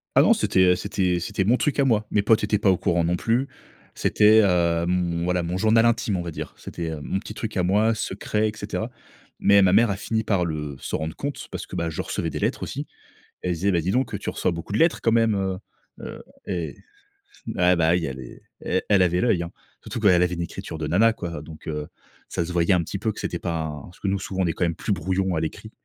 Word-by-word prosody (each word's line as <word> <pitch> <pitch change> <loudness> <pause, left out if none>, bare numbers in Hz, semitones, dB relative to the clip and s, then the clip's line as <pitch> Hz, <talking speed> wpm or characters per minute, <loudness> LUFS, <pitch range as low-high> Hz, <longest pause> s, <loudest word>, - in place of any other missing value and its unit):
Ah - - +8
non, - - +6
c'était, - - +1
heu, 90 0 +5
c'était 90 -2 -1
c'était 95 +2 -1
mon 115 +5 +4
truc 145 +3 0
à 140 - +4
moi. 110 -4 +2
Mes 105 - +3
potes 110 +2 +3
étaient 105 -1 +1
pas 100 - +3
au 95 - +4
courant 85 -1 +1
non 85 +1 +1
plus. 115 +8 0 0.5
C'était, 105 +1 +5
hem, 85 -2 +2
voilà 90 0 +1
mon 85 +2 -2
journal 110 +3 +4
intime 115 -4 +1
on - - -2
va 85 - -5
dire. - - -6
C'était, 85 -2 -5
heu, 80 - -5
mon 95 - -2
petit 105 - -8
truc 110 0 -5
à 90 - +1
moi 105 +5 +3
secret, 110 0 -1
et - - -4
cetera. 110 +3 -4 0.5
Mais 100 0 +5
ma 95 -2 +5
mère 115 +4 +5
a 100 - 0
fini 110 +2 -2
par 100 -5 +2
le 75 -4 -3
se - - -3
rendre 80 0 -4
compte 145 0 -5
parce - - -6
que, - - -7
bah, 85 0 -1
je 80 - -3
recevais - - -3
des - - -4
lettres - - -1
aussi. - - -5 0.6
Et 90 - 0
elle - - +1
se 80 - -8
disait: 100 - +2
«Ben 85 - +2
dis 90 +4 -1
donc, 125 0 0
heu, - - -1
tu - - -7
reçois - - 0
beaucoup 85 +3 -6
de 105 - +1
lettres 165 0 +3
quand 115 - +2
même, 115 -2 +3
heu-heu» 95 0 -6 0.2
et 85 -4 -3 0.8
ah, 90 0 +4
bah, 80 -1 +3
oui 85 -1 +2
elle 65 -1 -6
est 60 - -11 0.2
e-elle 95 +1 +2
avait 90 0 +2
l'œil 95 -5 +2
hein, 85 - -5 0.3
surtout - - -5
qu'elle 90 -5 +5
avait 90 0 +1
une 85 - -5
écriture 80 -1 -6
de 80 - -3
nana 105 +9 +4
quoi 85 -8 -6
donc, 80 0 -12
heu, 75 -1 -4 0.4
ça 85 - -1
se 90 - -5
voyait 85 +2 +2
un 90 - +2
petit 100 - -5
peu 110 +2 -1
que - - -9
c'était - - -3
pas 85 -2 -2
un 75 -2 -5
parce 90 - -14
que - - -3
nous 100 - +1
souvent 95 -1 -2
on - - +2
est 80 - +1
quand 90 - 0
même 85 -1 0
plus - - -2
brouillon 95 0 -1
à 80 - 0
l'écrit 80 - -5
90 Hz, 260 wpm, -24 LUFS, 85-105 Hz, 0.8 s, Ah